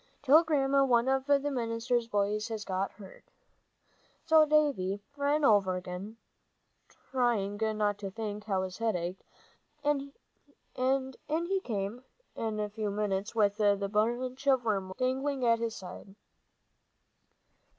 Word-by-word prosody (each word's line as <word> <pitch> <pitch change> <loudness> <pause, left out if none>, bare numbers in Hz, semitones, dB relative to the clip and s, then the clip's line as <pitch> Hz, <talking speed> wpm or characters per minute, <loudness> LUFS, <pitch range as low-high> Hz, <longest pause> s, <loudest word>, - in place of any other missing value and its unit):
Tell 295 +4 +7
Grandma 275 -3 +2
one 245 -2 +3
of 265 0 +1
the 285 -1 +5
minister's 235 -1 -1
boys 210 0 0
has 220 -2 -5
got 190 +1 -2
hurt." 195 -3 -13 1.0
So 315 -1 +6
Davie 280 -11 +2 0.2
ran 290 +1 +1
over 200 -5 +4
again, 180 +4 -6 0.9
trying 235 -6 +1
not 215 -2 0
to 200 -1 -4
think 210 0 -5
how 190 -3 0
his 185 +1 -6
head 225 -3 +1
ached, 175 +2 -4 0.6
and 280 -1 0 0.6
in 265 +1 0
he 340 +5 0
came 210 +2 -3 0.3
in 220 -1 -3
a 210 - -1
few 210 0 -3
minutes 200 0 -2
with 205 -2 +2
the 200 -1 +2
bunch 250 +5 -1
of 260 -3 +3
wormwood 195 -3 -1
dangling 260 +1 -1
at 230 -1 +4
his 230 -1 -2
side. 195 +1 -10
225 Hz, 135 wpm, -30 LUFS, 205-265 Hz, 1.0 s, Tell